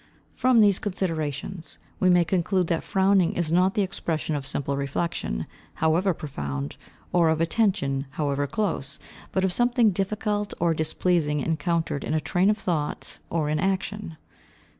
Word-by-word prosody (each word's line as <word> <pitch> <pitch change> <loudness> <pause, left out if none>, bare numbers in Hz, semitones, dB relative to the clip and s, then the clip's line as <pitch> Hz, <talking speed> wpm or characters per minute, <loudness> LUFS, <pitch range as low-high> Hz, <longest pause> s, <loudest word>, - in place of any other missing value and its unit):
From 255 -3 +4
these 200 -3 +4
considerations, 165 -4 -3 0.2
we 185 - +4
may 175 -1 +5
conclude 185 +1 +1
that 165 - 0
frowning 190 -2 +3
is 170 -2 -1
not 185 +3 +3
the 205 - +3
expression 165 -5 -2
of 140 -2 -4
simple 140 0 -2
reflection, 140 - -2 0.3
however 165 +5 +2
profound, 70 - -5 0.4
or 170 -2 +4
of 160 0 +1
attention, 165 -7 +1
however 145 -1 -1
close, 150 -4 -2 0.3
but 190 0 +1
of 185 - +1
something 240 -1 +3
difficult 205 +2 -1
or 170 -1 +2
displeasing 155 -1 +1
encountered 160 -1 -1
in 155 - -1
a - - +3
train 180 +5 +2
of 210 - +2
thought 165 -7 -3
or 160 -3 0
in 155 0 0
action. 190 -1 -2
170 Hz, 150 wpm, -25 LUFS, 150-195 Hz, 0.4 s, may